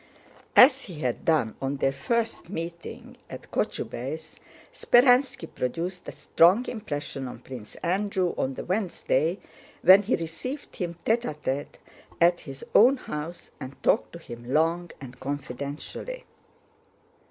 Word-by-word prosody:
As -, -, +7 dB
he 165 Hz, -6 st, -9 dB
had 125 Hz, -4 st, -2 dB
done 140 Hz, -10 st, +2 dB
on 135 Hz, +1 st, -1 dB
their 135 Hz, -, +2 dB
first 230 Hz, -, -2 dB
meeting 170 Hz, -2 st, -7 dB
at -, -, -10 dB
Kochubéy's, 155 Hz, +6 st, -4 dB, 0.3 s
Speránski 250 Hz, -, +4 dB
produced 170 Hz, +8 st, -3 dB
a -, -, -4 dB
strong 185 Hz, +9 st, +4 dB
impression 145 Hz, -, -4 dB
on 125 Hz, -, -7 dB
Prince 125 Hz, -5 st, -10 dB
Andrew 185 Hz, 0 st, 0 dB
on 130 Hz, 0 st, -1 dB
the -, -, -6 dB
Wednesday, 180 Hz, -4 st, 0 dB, 0.5 s
when 190 Hz, +2 st, +9 dB
he 205 Hz, -, +1 dB
received 170 Hz, -, -6 dB
him 175 Hz, -2 st, -3 dB
tête 230 Hz, +2 st, +3 dB
à 155 Hz, -11 st, -4 dB
tête 145 Hz, -1 st, -3 dB, 0.4 s
at 175 Hz, +1 st, +5 dB
his 135 Hz, -1 st, -9 dB
own 255 Hz, +6 st, +7 dB
house 160 Hz, -5 st, -7 dB
and 130 Hz, +1 st, -7 dB
talked -, -, +2 dB
to -, -, -7 dB
him 120 Hz, -6 st, -9 dB
long 165 Hz, +3 st, +2 dB
and 125 Hz, -2 st, -11 dB
confidentially. 145 Hz, -, -5 dB
165 Hz, 135 wpm, -27 LUFS, 135-200 Hz, 0.5 s, when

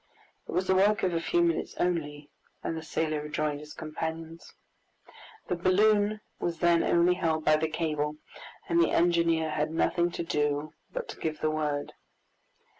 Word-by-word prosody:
It -, -, -6 dB
was 185 Hz, -, 0 dB
the 190 Hz, -, +3 dB
work 200 Hz, +3 st, +3 dB
of 185 Hz, -2 st, +1 dB
a 165 Hz, -, 0 dB
few 170 Hz, +1 st, +2 dB
minutes 170 Hz, -1 st, 0 dB
only, 150 Hz, -4 st, -2 dB, 0.3 s
and 165 Hz, -, -2 dB
the 160 Hz, -, -4 dB
sailor 155 Hz, -1 st, -1 dB
rejoined 150 Hz, -1 st, -2 dB
his 150 Hz, 0 st, -11 dB
companions. 160 Hz, +1 st, -6 dB, 0.9 s
The 180 Hz, -, 0 dB
balloon 205 Hz, +4 st, +3 dB, 0.2 s
was 170 Hz, -1 st, -2 dB
then 170 Hz, 0 st, +4 dB
only 175 Hz, +1 st, +4 dB
held 160 Hz, -3 st, -1 dB
by 155 Hz, 0 st, +5 dB
the 160 Hz, 0 st, -1 dB
cable, 150 Hz, -2 st, -1 dB, 0.5 s
and 170 Hz, 0 st, +3 dB
the -, -, +3 dB
engineer 170 Hz, -2 st, +2 dB
had 150 Hz, 0 st, 0 dB
nothing 170 Hz, +2 st, +1 dB
to -, -, -3 dB
do 150 Hz, -2 st, -1 dB, 0.2 s
but -, -, -4 dB
to -, -, -8 dB
give 155 Hz, -1 st, -3 dB
the 155 Hz, -, +1 dB
word. 150 Hz, -2 st, -2 dB
165 Hz, 170 wpm, -29 LUFS, 155-175 Hz, 0.9 s, by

